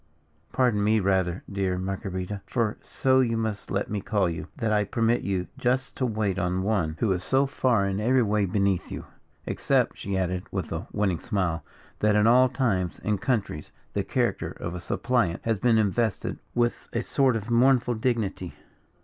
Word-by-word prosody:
"Pardon 120 -6 +2
me, 110 +1 +3
rather, 95 -2 +1
dear 95 -2 -1
Marguerita 95 +1 -4
for 115 -4 -1
so 130 0 +2
you 115 -3 +2
must 110 -2 -3
let 100 0 -1
me 105 -1 -3
call 100 -3 +1
you 85 -1 -4
that 115 -5 0
I 105 0 +3
permit 115 +3 +1
you 95 -2 -1 0.2
thus 130 +2 +1
to 130 - -1
wait 105 -4 -1
on 90 0 0
one, 95 -7 0
who 110 - +2
is 90 -1 -1
so 135 +6 +3
far 125 -6 +1
in 100 0 -1
every 125 +3 +3
way 105 -1 +1
beneath 100 -1 0
you. - - -6 0.4
Except," - - +1
she 100 -1 -2
added, 90 -1 -2
with - - -4
a - - -4
winning 95 -5 0
smile, 90 -8 -1 0.4
"that 105 0 +3
in 105 0 +4
all 125 +2 +6
times 105 -9 -1
and 105 -2 0
countries 110 - -2 0.2
the - - 0
character - - -1
of 85 - -6
a 90 - -5
suppliant 95 0 0
has 110 -3 +1
been 115 +1 +3
invested 110 0 0 0.2
with 120 0 0
a 120 0 0
sort 135 -4 +2
of 115 +1 -4
mournful 125 0 +4
dignity." 110 -6 -2
105 Hz, 185 wpm, -26 LUFS, 95-120 Hz, 0.4 s, all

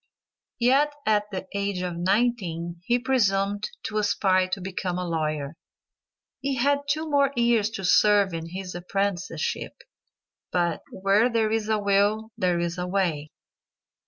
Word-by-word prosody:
Yet 275 +5 +3
at 210 -1 +2
the 190 -2 -5
age 200 -2 -2
of 180 -1 -3
nineteen 175 -3 0
he 240 +3 +3
presumed 205 -5 +1
to 215 -1 -2
aspire 190 -3 +2
to 190 +1 -2
become 180 -1 -3
a 180 -1 -3
lawyer! 155 -3 -2 0.9
He 275 0 -1
had 285 +3 +1
two 310 +2 0
more 280 -2 +3
years 235 -3 +3
to 195 - -5
serve 200 0 +4
in 165 0 -5
his 185 +1 -6
apprenticeship, 180 -2 -2 0.8
but 175 -3 0
"Where 200 +5 +2
there's 220 -2 0
a 220 - +3
will 205 +2 +1
there's 175 -4 0
a 180 - -2
way." 175 -6 -1
200 Hz, 135 wpm, -25 LUFS, 180-225 Hz, 0.9 s, serve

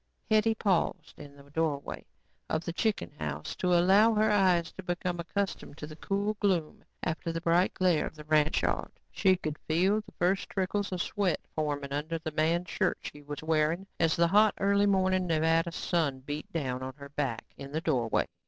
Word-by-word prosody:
Hetty 220 +1 +4
paused 195 -5 -1
in 145 -1 -11
the 140 0 -17
doorway 150 -2 -2 0.5
of 160 +1 -1
the 170 - -3
chicken 205 - -1
house 75 0 -4
to 180 -1 +2
allow 200 +6 +5
her 215 0 +3
eyes 185 -5 +3
to - - -9
become 175 -1 -3
accustomed 190 -3 -3
to 150 - -6
the 155 0 -10
cool 200 +5 -1
gloom 180 -7 0 0.2
after 165 +1 -2
the 165 - -3
bright 170 +2 +2
glare 180 -4 +2
of - - -10
the 150 - -10
ranch 155 0 +2
yard. - - -1 0.2
She 190 -2 +3
could 155 -4 -5
feel 190 +7 +2
the - - -17
first 185 +2 +1
trickles 200 +1 -1
of 180 -1 -1
sweat 200 -5 0
forming 145 -2 -2
under 155 +3 -2
the 160 -1 -5
man's 165 +3 0
shirt - - +1
she 145 - -8
was 145 +1 -7
wearing 160 +3 +1
as 165 -1 +3
the 170 0 +3
hot, 210 +2 +5
early 200 +1 +3
morning 185 -2 +2
Nevada 165 +1 +2
sun 155 -6 -1
beat 145 +3 -6
down 130 -6 -2
on 130 0 -6
her 140 -1 -11
back 135 -5 -3
in 140 0 -9
the 160 +2 -2
doorway. 125 -9 +1
165 Hz, 190 wpm, -30 LUFS, 150-190 Hz, 0.5 s, allow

